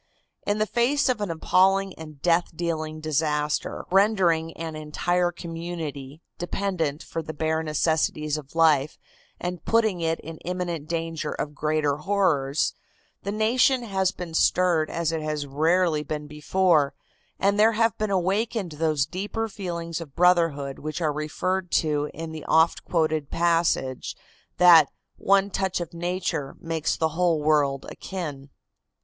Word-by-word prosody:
In 205 Hz, +1 st, +1 dB
the 215 Hz, -, +2 dB
face 260 Hz, +5 st, +1 dB
of 245 Hz, -4 st, 0 dB
an 205 Hz, -, -2 dB
appalling 190 Hz, +4 st, +2 dB
and 155 Hz, -3 st, -11 dB
death 175 Hz, 0 st, +3 dB
dealing 155 Hz, -2 st, -3 dB
disaster, 150 Hz, -1 st, -1 dB
rendering 185 Hz, -5 st, +3 dB
an 165 Hz, -1 st, -5 dB
entire 175 Hz, +3 st, 0 dB
community 165 Hz, -4 st, -6 dB, 0.2 s
dependent 175 Hz, -5 st, -2 dB
for 165 Hz, -, -4 dB
the 155 Hz, -1 st, -7 dB
bare 160 Hz, +1 st, 0 dB
necessities 155 Hz, -1 st, 0 dB
of 150 Hz, 0 st, -8 dB
life 155 Hz, -3 st, +3 dB, 0.4 s
and 180 Hz, -2 st, -4 dB
putting 220 Hz, -6 st, +2 dB
it 165 Hz, 0 st, 0 dB
in 160 Hz, +1 st, -8 dB
imminent 175 Hz, -3 st, -4 dB
danger 165 Hz, -2 st, -3 dB
of 150 Hz, -, -4 dB
greater 150 Hz, -1 st, 0 dB
horrors, 155 Hz, -7 st, +1 dB, 0.5 s
the 200 Hz, -, -3 dB
nation 245 Hz, +4 st, +2 dB
has 190 Hz, -4 st, 0 dB
been 175 Hz, -3 st, -8 dB
stirred 165 Hz, -1 st, +3 dB
as 165 Hz, -1 st, -1 dB
it 160 Hz, -1 st, -2 dB
has 150 Hz, -1 st, -2 dB
rarely 160 Hz, +3 st, +2 dB
been 150 Hz, 0 st, -5 dB
before, 150 Hz, -1 st, +1 dB, 0.4 s
and 200 Hz, +1 st, +1 dB
there 220 Hz, +2 st, +5 dB
have 225 Hz, -1 st, +2 dB
been 215 Hz, -1 st, 0 dB
awakened 195 Hz, +1 st, 0 dB
those 155 Hz, -2 st, +1 dB
deeper 205 Hz, +7 st, -3 dB
feelings 170 Hz, -5 st, -5 dB
of 145 Hz, -5 st, -10 dB
brotherhood 165 Hz, -6 st, +2 dB
which 155 Hz, +2 st, -4 dB
are 155 Hz, -3 st, 0 dB
referred 180 Hz, +5 st, -2 dB
to 150 Hz, -2 st, +1 dB
in 165 Hz, 0 st, -7 dB
the 155 Hz, -1 st, -7 dB
oft 160 Hz, +1 st, +3 dB
quoted 155 Hz, -4 st, 0 dB
passage 165 Hz, -6 st, 0 dB, 0.4 s
that 170 Hz, -5 st, +8 dB, 0.3 s
"one 200 Hz, +1 st, +3 dB
touch 190 Hz, -2 st, -1 dB
of 170 Hz, -2 st, -6 dB
nature 170 Hz, -4 st, -3 dB
makes 165 Hz, -1 st, -2 dB
the 160 Hz, -, +1 dB
whole 165 Hz, 0 st, +1 dB
world 145 Hz, -3 st, +2 dB
akin." 150 Hz, -7 st, -6 dB
165 Hz, 145 wpm, -25 LUFS, 155-185 Hz, 0.5 s, that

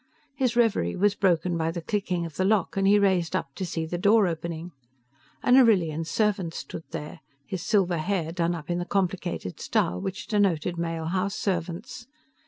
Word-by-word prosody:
His 255 Hz, -4 st, 0 dB
reverie 220 Hz, -, +2 dB
was 205 Hz, +1 st, +3 dB
broken 180 Hz, -3 st, +1 dB
by 165 Hz, -1 st, 0 dB
the 170 Hz, +1 st, -3 dB
clicking 180 Hz, -3 st, -1 dB
of 160 Hz, -3 st, -8 dB
the 185 Hz, -, 0 dB
lock 200 Hz, 0 st, +1 dB
and 195 Hz, 0 st, +2 dB
he 205 Hz, +1 st, +6 dB
raised 190 Hz, -4 st, +2 dB
up 140 Hz, -, -3 dB
to 190 Hz, -, -5 dB
see 165 Hz, -2 st, -3 dB
the 175 Hz, +2 st, -4 dB
door 205 Hz, +3 st, +5 dB
opening. 170 Hz, 0 st, -4 dB, 0.7 s
An 250 Hz, -, +5 dB
Arrillian 175 Hz, -, +4 dB
servant 195 Hz, -5 st, 0 dB
stood 160 Hz, -, -7 dB
there, 150 Hz, -, -6 dB, 0.3 s
his 185 Hz, +2 st, -4 dB
silver 185 Hz, -6 st, +2 dB
hair 170 Hz, -1 st, -1 dB
done 170 Hz, 0 st, 0 dB
up 165 Hz, 0 st, -6 dB
in 175 Hz, -, 0 dB
the 175 Hz, -, -3 dB
complicated 180 Hz, -, -2 dB
style 90 Hz, +1 st, 0 dB
which 190 Hz, 0 st, -4 dB
denoted 180 Hz, -5 st, +1 dB
male 165 Hz, -1 st, -3 dB
house 185 Hz, +3 st, -1 dB
servants. 190 Hz, +6 st, -3 dB
180 Hz, 185 wpm, -26 LUFS, 165-200 Hz, 0.7 s, he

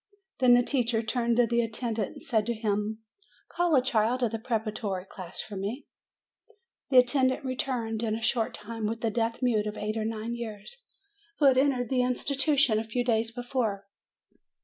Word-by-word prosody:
Then 250 Hz, -2 st, +6 dB
the 245 Hz, -, +4 dB
teacher 240 Hz, -4 st, 0 dB
turned 235 Hz, 0 st, 0 dB
to 245 Hz, -, +5 dB
the 235 Hz, 0 st, +1 dB
attendant 225 Hz, -2 st, -2 dB
and -, -, -12 dB
said 220 Hz, -2 st, 0 dB
to 235 Hz, -, 0 dB
him: 215 Hz, 0 st, -2 dB, 0.5 s
"Call 345 Hz, -2 st, +1 dB
a 255 Hz, -, +4 dB
child 245 Hz, 0 st, +1 dB
of 230 Hz, -, +1 dB
the 225 Hz, -, -3 dB
preparatory 215 Hz, -5 st, -3 dB
class 185 Hz, -2 st, -7 dB
for 210 Hz, -, -8 dB
me." 205 Hz, +8 st, -4 dB, 1.0 s
The 260 Hz, -, +4 dB
attendant 260 Hz, +1 st, +3 dB
returned, 245 Hz, -4 st, -2 dB
in 220 Hz, -2 st, 0 dB
a 225 Hz, -, -5 dB
short 225 Hz, -1 st, +1 dB
time, 220 Hz, 0 st, -5 dB
with 230 Hz, +1 st, -3 dB
a 225 Hz, -, +1 dB
deaf 230 Hz, +2 st, -1 dB
mute 220 Hz, -4 st, +2 dB
of 210 Hz, -, -5 dB
eight 215 Hz, +1 st, -3 dB
or 215 Hz, -, -1 dB
nine 225 Hz, +1 st, -3 dB
years, 235 Hz, -, -7 dB, 0.5 s
who 295 Hz, -, +2 dB
had 260 Hz, -2 st, +6 dB
entered 260 Hz, -4 st, +1 dB
the 255 Hz, -1 st, +3 dB
institution 270 Hz, -1 st, +2 dB
a -, -, -2 dB
few 230 Hz, +2 st, -2 dB
days 225 Hz, -1 st, +1 dB
before. 230 Hz, -4 st, -2 dB
230 Hz, 185 wpm, -28 LUFS, 220-250 Hz, 1.0 s, Then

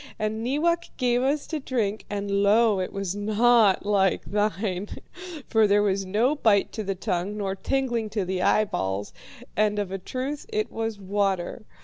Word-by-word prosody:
And 215 Hz, +1 st, -2 dB
Neewak 335 Hz, +7 st, 0 dB
gave 245 Hz, -2 st, +2 dB
us 280 Hz, +3 st, 0 dB
to 315 Hz, -, -3 dB
drink, 220 Hz, -6 st, -2 dB
and 200 Hz, -1 st, -1 dB
lo, 210 Hz, 0 st, +4 dB
it 185 Hz, -, -3 dB
was 195 Hz, -1 st, -3 dB
not 215 Hz, 0 st, +3 dB
like 195 Hz, -2 st, +2 dB
thine, 205 Hz, -1 st, -1 dB, 0.6 s
for 220 Hz, -1 st, +4 dB
there 205 Hz, +1 st, +4 dB
was 195 Hz, -1 st, 0 dB
no 225 Hz, +9 st, +2 dB
bite 220 Hz, -9 st, +2 dB
to 215 Hz, -, -4 dB
the 195 Hz, -1 st, -2 dB
tongue 190 Hz, +1 st, -2 dB
nor 195 Hz, -2 st, -2 dB
tingling 240 Hz, 0 st, -1 dB
to 205 Hz, -2 st, -2 dB
the 185 Hz, 0 st, -2 dB
eyeballs, 100 Hz, -, 0 dB, 0.4 s
and 210 Hz, 0 st, +2 dB
of 200 Hz, -2 st, -2 dB
a 195 Hz, -, -3 dB
truth 260 Hz, +9 st, -5 dB
it 430 Hz, -1 st, -2 dB
was 225 Hz, -1 st, -3 dB
water. 195 Hz, +1 st, -1 dB
210 Hz, 165 wpm, -25 LUFS, 195-235 Hz, 0.6 s, lo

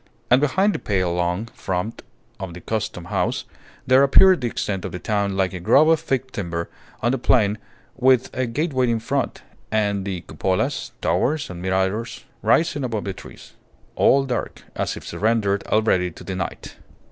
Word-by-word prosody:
And 125 Hz, +2 st, +6 dB
behind 190 Hz, +8 st, +2 dB
the -, -, -3 dB
pale 95 Hz, -4 st, 0 dB
long 90 Hz, +4 st, -1 dB
front 95 Hz, +4 st, -3 dB, 0.4 s
of 95 Hz, -3 st, -6 dB
the 90 Hz, -, -9 dB
Custom 105 Hz, -5 st, -3 dB
House, -, -, -1 dB, 0.4 s
there 130 Hz, +1 st, +5 dB
appeared 180 Hz, +6 st, +6 dB
the 120 Hz, -, 0 dB
extent 100 Hz, -4 st, -3 dB
of -, -, -4 dB
the -, -, -4 dB
town 100 Hz, 0 st, -1 dB
like 95 Hz, -1 st, +1 dB
a 90 Hz, -, -5 dB
grove 140 Hz, -, +5 dB
of 165 Hz, -1 st, +4 dB
thick 135 Hz, -4 st, -2 dB
timber 85 Hz, -6 st, -4 dB, 0.3 s
on 120 Hz, -, +3 dB
the 135 Hz, -, -1 dB
plain 105 Hz, -4 st, +2 dB, 0.4 s
with 130 Hz, -1 st, +3 dB
a 130 Hz, 0 st, 0 dB
gateway 130 Hz, 0 st, 0 dB
in 115 Hz, -1 st, +1 dB
front, 135 Hz, +3 st, -2 dB, 0.3 s
and 105 Hz, -2 st, +1 dB
the 95 Hz, -3 st, -4 dB
cupolas, 95 Hz, +1 st, -2 dB
towers, 125 Hz, -, 0 dB
and 85 Hz, -1 st, -8 dB
miradors 95 Hz, +5 st, -1 dB, 0.2 s
rising 160 Hz, -3 st, +2 dB
above 115 Hz, -5 st, -2 dB
the 100 Hz, -, -3 dB
trees, -, -, -13 dB, 0.4 s
all 135 Hz, 0 st, +4 dB
dark, 125 Hz, -3 st, -4 dB
as -, -, -2 dB
if -, -, -10 dB
surrendered 105 Hz, -2 st, 0 dB
already 100 Hz, -5 st, +2 dB
to 85 Hz, -, -12 dB
the 95 Hz, -, -5 dB
night. 95 Hz, -, -5 dB
110 Hz, 175 wpm, -22 LUFS, 95-130 Hz, 0.4 s, And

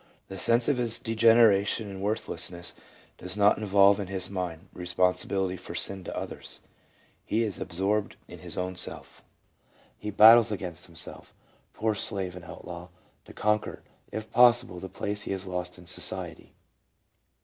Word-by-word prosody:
The 95 Hz, -1 st, -7 dB
sense 115 Hz, +3 st, +2 dB
of 145 Hz, -, +2 dB
his 115 Hz, -2 st, 0 dB
degradation 110 Hz, -2 st, +4 dB
and 95 Hz, -1 st, -8 dB
worth 105 Hz, +3 st, -1 dB
lessness 85 Hz, -1 st, -4 dB, 0.5 s
does 90 Hz, +2 st, -6 dB
not 105 Hz, 0 st, +4 dB
involve 100 Hz, -1 st, +4 dB
in 100 Hz, -, -4 dB
his 95 Hz, 0 st, -4 dB
mind 90 Hz, -4 st, -4 dB
responsibility 90 Hz, +1 st, 0 dB
for -, -, -9 dB
sin 95 Hz, -1 st, -1 dB
to -, -, -6 dB
others; -, -, -7 dB, 0.6 s
he 115 Hz, +2 st, 0 dB
is 105 Hz, -6 st, -3 dB
absorbed 100 Hz, +4 st, -1 dB
in -, -, -11 dB
his -, -, -6 dB
own 90 Hz, 0 st, -3 dB
self. 90 Hz, -, -2 dB, 0.8 s
He 105 Hz, -, -5 dB
battles 110 Hz, +2 st, +7 dB
against 90 Hz, -3 st, -5 dB
himself, 85 Hz, -1 st, -8 dB, 0.4 s
poor 110 Hz, 0 st, 0 dB
slave 95 Hz, -3 st, -2 dB
and 90 Hz, -2 st, -10 dB
outlaw, 85 Hz, +2 st, -9 dB, 0.4 s
to -, -, -13 dB
conquer, 105 Hz, 0 st, -1 dB, 0.3 s
if 110 Hz, 0 st, -6 dB
possible, 120 Hz, -7 st, +5 dB
the 95 Hz, -, -7 dB
place 105 Hz, +2 st, -4 dB
he -, -, -5 dB
has 95 Hz, 0 st, -4 dB
lost 90 Hz, -1 st, -5 dB
in 90 Hz, -, -14 dB
society. -, -, -3 dB
100 Hz, 155 wpm, -28 LUFS, 90-105 Hz, 0.8 s, battles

